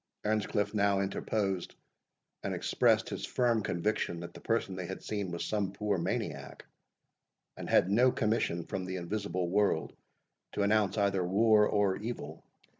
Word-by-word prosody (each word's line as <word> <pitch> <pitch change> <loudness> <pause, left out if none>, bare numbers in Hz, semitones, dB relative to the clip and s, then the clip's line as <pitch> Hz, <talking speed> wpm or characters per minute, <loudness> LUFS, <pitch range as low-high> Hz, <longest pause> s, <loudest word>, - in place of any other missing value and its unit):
Earnscliff 105 0 0
now 100 -2 +2
interposed, 95 -1 -2 0.7
and - - -2
expressed - - +2
his - - -5
firm 120 -3 +1
conviction 85 -2 -1
that 85 0 -8
the - - -11
person 115 -4 -1
they 90 -2 -5
had 95 - -7
seen 100 -3 -3
was 85 -1 -3
some 100 -3 -1
poor 105 -2 -1
maniac, - - -4 0.9
and - - -7
had 95 - +4
no 125 +5 +5
commission 105 -8 0
from 95 - -4
the 95 0 -4
invisible 90 0 -2
world 100 +3 +1 0.6
to 100 - 0
announce 105 -1 +2
either 100 -2 +2
war 105 +3 +4
or 100 -2 +2
evil. 105 -10 -6
100 Hz, 150 wpm, -31 LUFS, 95-110 Hz, 0.9 s, no